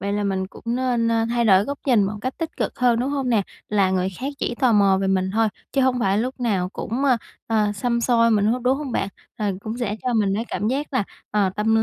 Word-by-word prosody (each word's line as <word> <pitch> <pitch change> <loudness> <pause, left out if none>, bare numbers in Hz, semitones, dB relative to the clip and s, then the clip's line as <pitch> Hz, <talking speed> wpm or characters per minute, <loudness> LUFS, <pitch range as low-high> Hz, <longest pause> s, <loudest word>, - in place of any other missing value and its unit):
vậy 200 +1 -2
là 205 0 -1
mình 190 -1 -1
cũng - - -15
nên, 240 -1 +1
a, 225 0 +2
thay 240 0 +1
đổi 195 -2 +5
góc 280 0 -4
nhìn 235 -6 +4
một 200 - -2
cách 255 +2 -3
tích 330 -1 -4
cực - - -3
hơn, 245 -2 +3
đúng 265 +3 -1
hông 275 -3 -1
nè? 220 -4 +3 0.3
Là 200 -3 +2
người 185 0 +1
khác 265 - -4
chỉ 240 - -2
tò 250 -2 +2
mò 200 -2 +4
về 195 - 0
mình 190 0 +1
thôi, 225 0 +2 0.2
chứ 275 - +2
hông 255 -1 +2
phải 195 -2 +2
lúc 255 +3 -3
nào 195 -7 0
cũng, 255 +6 -3
ơ, 255 -3 +4 0.3
ờ, 215 -2 +1
xăm 235 +3 -1
soi 230 -1 +3
mình 210 -1 +3
hết, 240 +3 +2
đúng 260 +2 +2
hông 280 -5 -5
bạn? 195 - 0 0.3
Ờ, 205 -3 -1
cũng 220 +3 -5
sẽ 215 -3 -2
cho 250 -2 0
mình 200 -3 +2
cái 225 - -1
cảm 210 - -1
giác 280 +3 -2
là, 245 -6 +1 0.3
ờ, 205 -3 +2
tâm 220 +1 +2
225 Hz, 270 wpm, -23 LUFS, 200-250 Hz, 0.3 s, đổi